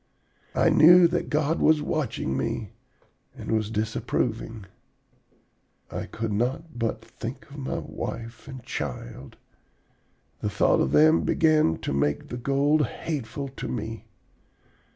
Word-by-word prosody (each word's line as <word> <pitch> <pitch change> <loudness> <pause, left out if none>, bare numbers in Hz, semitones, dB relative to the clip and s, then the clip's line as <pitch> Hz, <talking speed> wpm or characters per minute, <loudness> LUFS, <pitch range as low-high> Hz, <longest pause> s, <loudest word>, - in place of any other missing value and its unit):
I - - +4
knew 175 +3 +8
that 175 0 -2
God 150 +1 +1
was 155 -1 +5
watching 150 - -2
me 70 - -2 0.7
and - - -5
was 110 -1 +1
disapproving. 110 0 -2 1.3
I - - -4
could 115 -1 -4
not 125 +5 -2
but 115 -1 -2
think 120 +3 -8
of 145 - -10
my 135 - -3
wife 115 +3 -6
and 130 -3 -8
child. 65 +3 -6 1.0
The 105 - -1
thought 100 - +3
of 65 - +1
them 80 +2 +6
began 155 - +3
to - - -2
make 70 +1 0
the 120 - -4
gold 140 +3 +2
hateful 140 -3 -4
to 135 - -7
me. 110 -1 -5
120 Hz, 130 wpm, -26 LUFS, 105-150 Hz, 1.3 s, knew